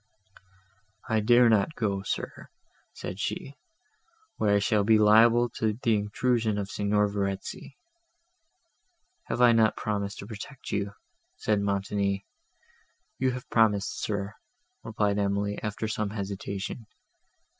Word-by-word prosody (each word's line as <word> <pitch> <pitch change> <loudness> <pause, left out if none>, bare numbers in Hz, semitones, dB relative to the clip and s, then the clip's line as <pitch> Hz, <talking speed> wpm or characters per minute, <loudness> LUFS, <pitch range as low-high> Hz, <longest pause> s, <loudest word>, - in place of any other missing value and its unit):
"I 110 -1 +2
dare 120 +3 +5
not 110 +7 +2
go, 100 -4 -1
sir," 95 - -5 0.4
said 90 - -7
she, 135 - -3 0.8
"where 105 -1 +2
I - - +5
shall 105 0 +2
be 110 +1 +5
liable 115 +3 +6
to 110 -1 +1
the 115 0 +1
intrusion 110 +1 0
of 100 0 -4
Signor 105 0 +1
Verezzi." 100 +6 -4 1.5
"Have 125 - -2
I 120 - +8
not 110 -2 +3
promised 100 -1 -3
to - - -7
protect 120 +5 -9
you?" 100 -1 -2 0.4
said 105 -2 0
Montoni. 100 0 -1 0.9
"You 130 - +2
have 125 0 -7
promised, 105 -4 +2
sir,"—replied 105 - -4
Emily, 100 0 -1
after 105 +1 -3
some 105 -1 -2
hesitation. 100 +1 -5
105 Hz, 120 wpm, -27 LUFS, 100-115 Hz, 1.5 s, I